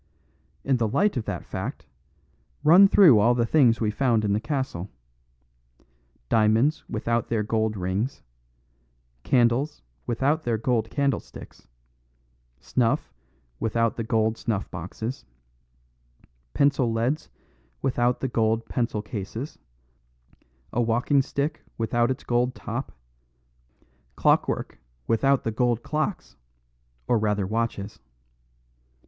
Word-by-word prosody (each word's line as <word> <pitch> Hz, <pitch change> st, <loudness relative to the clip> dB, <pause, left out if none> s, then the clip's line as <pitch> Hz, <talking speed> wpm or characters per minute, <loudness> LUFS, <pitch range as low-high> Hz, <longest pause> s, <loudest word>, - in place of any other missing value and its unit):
In 135 Hz, -2 st, +2 dB
the 115 Hz, -2 st, +1 dB
light 190 Hz, -, +1 dB
of 120 Hz, -4 st, -2 dB
that -, -, -4 dB
fact, -, -, -5 dB, 0.8 s
run 175 Hz, +6 st, +8 dB
through 170 Hz, -, +7 dB
all 120 Hz, +4 st, +4 dB
the 120 Hz, -1 st, +1 dB
things 120 Hz, -4 st, +4 dB
we 110 Hz, -2 st, 0 dB
found 115 Hz, -2 st, +1 dB
in 100 Hz, -, +1 dB
the 105 Hz, -, +1 dB
castle. 115 Hz, -, -3 dB, 1.4 s
Diamonds 110 Hz, -, +2 dB
without 115 Hz, 0 st, -1 dB
their 110 Hz, -2 st, 0 dB
gold 110 Hz, 0 st, -1 dB
rings; 95 Hz, -, -2 dB, 1.0 s
candles 125 Hz, -, +1 dB, 0.2 s
without 140 Hz, +7 st, 0 dB
their 115 Hz, -2 st, 0 dB
gold 115 Hz, -1 st, 0 dB
candlesticks; 140 Hz, -, -3 dB, 0.9 s
snuff 120 Hz, -3 st, 0 dB, 0.5 s
without 115 Hz, 0 st, 0 dB
the 115 Hz, -, -3 dB
gold 110 Hz, 0 st, 0 dB
snuff 105 Hz, -4 st, -3 dB
boxes; 95 Hz, +8 st, -6 dB, 1.3 s
pencil 140 Hz, -4 st, +2 dB
leads 115 Hz, -, -1 dB, 0.5 s
without 125 Hz, -1 st, +1 dB
the 135 Hz, -, 0 dB
gold 115 Hz, -1 st, 0 dB
pencil 115 Hz, -3 st, -2 dB
cases; 110 Hz, +6 st, -6 dB, 1.1 s
a 120 Hz, -, +1 dB
walking 120 Hz, +5 st, +2 dB
stick 140 Hz, +2 st, -3 dB, 0.2 s
without 120 Hz, +1 st, +1 dB
its 130 Hz, -, -3 dB
gold 125 Hz, +1 st, 0 dB
top; 120 Hz, +4 st, -5 dB, 1.2 s
clockwork -, -, +1 dB, 0.3 s
without 135 Hz, +4 st, +2 dB
the 115 Hz, -, -1 dB
gold 120 Hz, +1 st, 0 dB
clocks 155 Hz, +5 st, -3 dB, 0.7 s
or 120 Hz, -, +3 dB
rather 105 Hz, -2 st, 0 dB
watches. 110 Hz, 0 st, -3 dB
115 Hz, 110 wpm, -25 LUFS, 110-130 Hz, 1.4 s, run